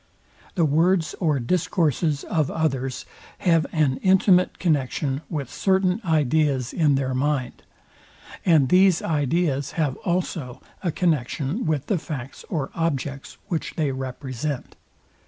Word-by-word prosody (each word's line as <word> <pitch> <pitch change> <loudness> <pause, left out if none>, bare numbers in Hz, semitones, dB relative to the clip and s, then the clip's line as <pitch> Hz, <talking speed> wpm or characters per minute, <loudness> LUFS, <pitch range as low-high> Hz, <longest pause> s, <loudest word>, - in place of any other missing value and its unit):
The 170 - +3
words 165 +3 +2
or 155 -6 +1
discourses 155 0 0
of 155 -5 0
others 135 -5 -2 0.3
have 165 -4 +2
an 145 -5 +1
intimate 185 -1 +3
connexion 140 -3 0
with 145 -6 -4
certain 190 +1 +1
ideas 150 - +1
in 150 -4 +3
their 130 -1 -1
mind; 135 -1 -1 0.8
and 155 -7 +4
these 185 0 +4
ideas 145 -2 0
have 150 -5 0
also 165 -8 -3 0.2
a 175 - 0
connexion 155 - -1
with 150 -3 0
the 190 0 0
facts 135 -5 -7
or 150 -7 -2
objects, 140 -4 -3
which 170 -5 -3
they 150 -4 0
represent. 130 +1 -5
155 Hz, 120 wpm, -24 LUFS, 135-170 Hz, 0.8 s, and